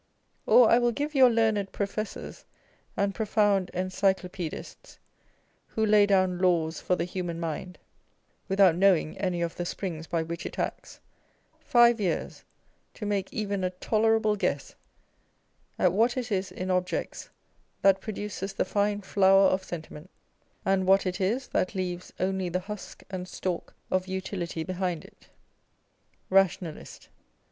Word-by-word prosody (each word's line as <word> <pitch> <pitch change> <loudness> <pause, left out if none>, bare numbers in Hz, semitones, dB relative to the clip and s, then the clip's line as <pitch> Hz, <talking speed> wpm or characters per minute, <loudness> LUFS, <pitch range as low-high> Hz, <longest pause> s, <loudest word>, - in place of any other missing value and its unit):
Or 245 -2 +7
I 235 - +6
will 240 0 +2
give 290 +6 -3
your 260 -3 +7
learned 220 -4 +1
professors 210 +1 -5 0.5
and 200 0 +1
profound 205 -3 +1
Encyclopedists, 185 -2 -2 0.7
who 220 - -1
lay 210 -1 +5
down 185 -3 +2
laws 170 -3 +1
for 180 - +1
the 170 - -1
human 175 -2 -4
mind 170 +2 -5 0.7
without 195 -3 +5
knowing 180 -4 +3
any 180 -3 -1
of 170 - -4
the 175 - -2
springs 170 -2 -5
by 165 -1 -1
which 170 +1 -6
it - - -7
acts, - - -4 0.6
five 240 -2 +4
years 180 -5 -2 0.5
to 210 - -6
make 200 -2 -1
even 200 -3 -2
a 185 - +1
tolerable 215 +3 +1
guess 205 - -2 1.0
at 180 -2 +3
what 235 +5 +2
it 245 -2 -3
is 190 -1 -1
in 185 +1 -3
objects 180 0 -2 0.5
that 195 -1 +5
produces 205 -2 -5
the - - 0
fine 205 0 0
flower 195 0 +5
of 185 0 0
Sentiment, 165 -1 -8 0.6
and 190 -1 +1
what 195 +1 +5
it 185 +1 -2
is 235 +8 0
that 185 - -1
leaves 180 -1 -4
only 190 -1 -1
the 180 +2 -1
husk 210 +1 -8
and 185 -1 -5
stalk 180 -2 -4 0.2
of 185 0 0
Utility 185 -3 -4
behind 180 -2 -3
it. - - -19 1.0
Rationalist. 185 -4 0
190 Hz, 140 wpm, -27 LUFS, 180-205 Hz, 1.0 s, Or